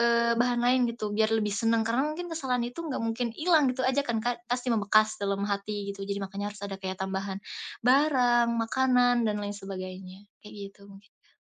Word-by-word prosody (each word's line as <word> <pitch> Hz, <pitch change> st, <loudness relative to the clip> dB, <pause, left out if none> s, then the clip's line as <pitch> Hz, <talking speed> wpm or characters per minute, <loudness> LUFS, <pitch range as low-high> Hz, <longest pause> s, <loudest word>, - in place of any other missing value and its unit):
eee, 235 Hz, 0 st, +3 dB
bahan 245 Hz, 0 st, +2 dB
lain, 255 Hz, +1 st, +4 dB
gitu, 215 Hz, -3 st, -4 dB
biar 215 Hz, +1 st, +2 dB
lebih 210 Hz, -2 st, +1 dB
senang. 225 Hz, +1 st, +1 dB
Karena 245 Hz, +6 st, +1 dB
mungkin 320 Hz, +4 st, -4 dB
kesalahan 255 Hz, -6 st, -1 dB
itu 290 Hz, +7 st, -8 dB
enggak 290 Hz, -5 st, -3 dB
mungkin 230 Hz, +2 st, -1 dB
hilang 315 Hz, -4 st, +4 dB
gitu 255 Hz, -, -5 dB
aja 265 Hz, +2 st, +2 dB
kan, 235 Hz, -3 st, -1 dB
Kak? 240 Hz, -1 st, -2 dB
Pasti 245 Hz, +1 st, -1 dB
membekas 215 Hz, -1 st, +3 dB
dalam 200 Hz, -1 st, -1 dB
hati, 200 Hz, 0 st, -3 dB
gitu. 200 Hz, 0 st, -6 dB
Jadi 200 Hz, 0 st, -3 dB
makanya 200 Hz, +1 st, -4 dB
harus 205 Hz, -, -14 dB
ada 200 Hz, -1 st, -5 dB
kayak 190 Hz, -1 st, -6 dB
tambahan 190 Hz, +1 st, -3 dB, 0.4 s
barang, 250 Hz, -2 st, +4 dB
makanan, 245 Hz, 0 st, +3 dB
dan 210 Hz, -1 st, 0 dB
lain 205 Hz, 0 st, -4 dB
sebagainya. 190 Hz, 0 st, -8 dB, 0.2 s
Kayak 210 Hz, -, -11 dB, 0.2 s
gitu 200 Hz, -, -26 dB
mungkin, 200 Hz, +2 st, -17 dB
Kak. -, -, -32 dB
225 Hz, 200 wpm, -28 LUFS, 200-245 Hz, 0.4 s, lain